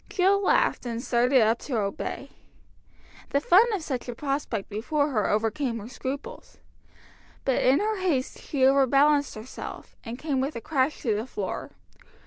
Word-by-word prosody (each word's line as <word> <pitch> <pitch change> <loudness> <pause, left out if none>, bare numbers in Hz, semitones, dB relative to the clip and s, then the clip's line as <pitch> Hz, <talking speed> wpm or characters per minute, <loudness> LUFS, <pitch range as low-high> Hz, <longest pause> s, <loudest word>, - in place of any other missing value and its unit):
Jill 390 +1 +3
laughed, - - +2
and 230 -1 -3
started 250 +1 +3
up 225 +2 +2
to 255 -5 -3
obey. 200 -2 -3 1.0
The 280 - +2
fun 395 +10 +5
of 395 -6 -2
such 255 -4 -4
a 240 - -4
prospect 275 -6 -3
before 285 +8 -1
her 215 -5 +1
overcame 225 +3 0
her 215 -1 -7
scruples. 275 - -7 0.9
But 265 - +2
in 265 +3 +4
her 430 0 -1
haste 310 -9 -1
she 270 -3 0
overbalanced 280 +2 +4
herself, 220 +4 -9
and 235 0 -6
came 280 -2 -1
with 275 +3 -2
a - - -3
crash 270 +3 0
to 225 - +1
the 215 +4 -3
floor. 200 -6 -4
265 Hz, 160 wpm, -26 LUFS, 230-295 Hz, 1.0 s, fun